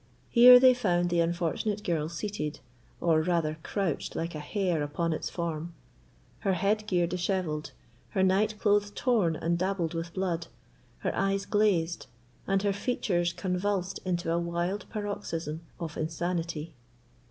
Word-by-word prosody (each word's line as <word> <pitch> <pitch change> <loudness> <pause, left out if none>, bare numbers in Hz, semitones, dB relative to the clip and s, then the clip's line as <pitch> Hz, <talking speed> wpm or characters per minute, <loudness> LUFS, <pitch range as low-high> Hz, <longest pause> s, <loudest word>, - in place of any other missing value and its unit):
Here 250 +1 +9
they 255 0 +7
found 175 -7 +1
the 170 - +2
unfortunate 175 +5 0
girl 165 -6 -1
seated, 170 -5 -4 0.4
or 160 -2 +3
rather 160 -2 0
couched 190 -4 -2
like 165 +1 -3
a 155 - -5
hare 175 +1 -1
upon 160 +3 -1
its - - -3
form—her 160 - -5
head 210 +4 0
gear 175 -3 +2
dishevelled, 175 -3 -2 0.4
her 190 - +1
night 205 +3 +2
clothes 205 -1 +3
torn 215 -10 +2
and 170 +2 -1
dabbled 185 -3 -1
with 165 0 -5
blood, 175 -3 -1 0.5
her - - -1
eyes 195 0 0
glazed, 185 -6 +1 0.4
and 195 0 +1
her 200 -1 +2
features 190 -6 0
convulsed 185 +1 -2
into 175 -2 -1
a 170 - +2
wild 170 +4 -2
paroxysm 200 -7 -4 0.2
of 165 -3 -5
insanity. 165 0 -3
175 Hz, 140 wpm, -29 LUFS, 165-200 Hz, 0.5 s, Here